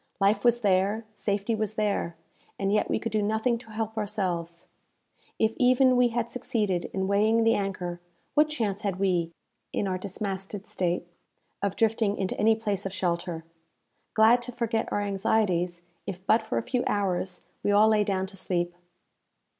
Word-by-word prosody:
Life 200 +1 +3
was 240 0 +4
there, 200 +2 +2
safety 205 +1 -1
was 215 0 -2
there, 205 -5 0 0.4
and 195 +1 0
yet 210 - +2
we - - +2
could 230 - -4
do 215 0 +1
nothing 220 +3 +1
to 240 - -14
help 220 0 -3
ourselves! 175 -5 -3 0.7
If 220 0 +2
even 255 +1 +5
we 250 0 +5
had 235 0 -1
succeeded 210 -7 -1
in 190 0 -2
weighing 215 +3 +3
the 225 0 +4
anchor, 185 -4 -3 0.3
what 300 +1 +4
chance 215 -9 -2
had 200 -4 -1
we, 180 -4 +1 0.4
in 200 - -1
our 185 -1 -1
dismasted 195 0 -4
state, 175 -4 -1 0.6
of 200 -1 -1
drifting 220 -2 +1
into 190 -1 -2
any 220 +2 +5
place 205 -3 -1
of 190 - -7
shelter? 175 -3 -2 0.7
Glad 225 +3 +6
to 245 +1 -6
forget 230 -2 -1
our 205 - 0
anxieties, 190 -4 0 0.2
if 185 -1 -6
but 220 +3 +4
for 220 - -3
a - - 0
few 245 0 -1
hours, 185 -2 -1 0.2
we - - 0
all 210 +2 +6
lay 215 -1 +4
down 190 -2 0
to 195 +1 -11
sleep. 175 -2 -1
205 Hz, 170 wpm, -27 LUFS, 190-225 Hz, 0.7 s, Glad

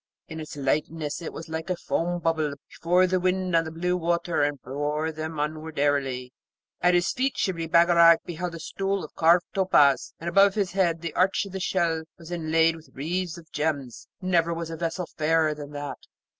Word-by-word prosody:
In 160 -1 -7
its 155 -1 -7
lightness 150 +3 -1
it 165 - -5
was 165 - -8
as 160 0 -3
a 180 - +1
foam 175 +1 -1
bubble 160 -3 0
before 180 +2 +2
the 185 0 +1
wind 185 0 0
on 165 0 +3
the 160 - -6
blue 180 +2 -1
water, 170 -1 0
and 145 -1 0
bore 145 +5 -2
them 155 0 -5
onward 155 +1 -4
airily. 135 -3 0 0.5
At 180 0 +4
his 175 +1 +2
feet 265 +1 -1
Shibli 165 -4 -1
Bagarag 170 0 +6
beheld 175 0 -4
a - - -7
stool 195 +3 -2
of 155 - -9
carved 170 +2 +4
topaz, 145 -9 +3
and 165 - -7
above 195 +3 +5
his 200 -3 0
head 170 -3 +1
the 170 -2 -4
arch 195 +3 +2
of 200 - -9
the 190 - -4
shell 170 -3 0 0.2
was 170 0 -12
inlaid 165 -1 +2
with 160 0 -14
wreaths 175 +4 -3
of 165 -2 -14
gems: 145 -5 -3 0.2
never 170 -2 +2
was 165 0 -5
vessel 165 +2 -3
fairer 160 -1 +1
than 145 -1 -8
that. 145 -1 -5
165 Hz, 195 wpm, -26 LUFS, 155-175 Hz, 0.5 s, Bagarag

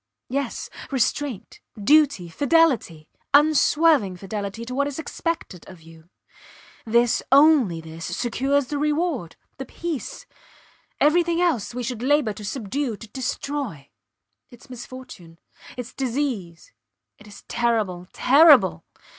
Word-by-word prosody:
Yes! 275 -1 -3 0.2
Restraint, 270 -2 -2 0.2
duty, 280 - +3
fidelity 255 - +1 0.3
unswerving 300 - +3
fidelity 200 +3 -6
to 250 - -6
what 280 +2 0
is 285 - -6
expected 320 - -4
of 180 -4 -14
you. 165 +1 -17 0.8
This 235 +1 +2
only 275 - +5
this 160 +1 -9
secures 270 +3 0
the 290 +3 -4
reward, 300 - -1 0.2
the 270 - -5
peace. 325 -8 -6 0.7
Everything 340 +3 +3
else 305 - 0
we 250 - -3
should 235 -1 -4
labour 270 -4 +2
to 210 - -10
subdue 235 +2 -3
to 230 - -11
destroy. 255 - -5 0.6
Its 245 +3 -17
misfortune; 245 -9 -11 0.4
its 245 -2 -7
disease. 240 - -4 0.5
It 210 - -16
is 205 - -13
terrible 215 -7 -1
terrible. 290 +1 +5
250 Hz, 115 wpm, -23 LUFS, 200-290 Hz, 0.8 s, only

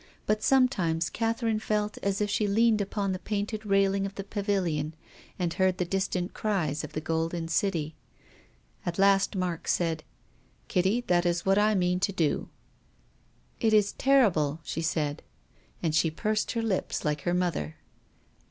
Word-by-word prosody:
But 215 0 +1
sometimes 190 -12 +2
Catherine 225 -1 0
felt 210 -1 -1
as 200 +1 -1
if 205 - +1
she 210 - +1
leaned 220 +1 +3
upon 200 0 -2
the 185 - -3
painted 210 +1 -3
railing 195 0 +3
of 195 - -10
the 195 - -5
Pavil 200 -1 -1
ion, 155 0 -2 0.4
and 175 -3 -1
heard 190 -1 +2
the 180 - 0
distant 185 0 -2
cries 165 -9 -1
of - - -7
the 155 - -3
golden 165 +1 -2
City. 165 -4 0 0.9
At 175 -1 -3
last 195 0 +3
Mark 180 -3 -2
said, 165 -3 0 0.3
" - - -36
Kitty, 190 +6 +2
that 175 -7 +2
is 170 0 0
what 195 +1 +4
I 210 +1 +3
mean 180 -1 +1
to 200 +2 +1
do." 165 -6 0 0.5
" - - -37
It 215 - +4
is 205 -1 +4
terrible," 190 - +3
she 165 - -4
said. 155 -2 -1 0.6
And 160 -2 +1
she 160 +1 +3
pursed 215 +6 -1
her 230 -1 -1
lips 200 -6 -1
like 150 -1 0
her 175 +4 0
mother. 170 - -1
190 Hz, 170 wpm, -28 LUFS, 165-210 Hz, 0.9 s, what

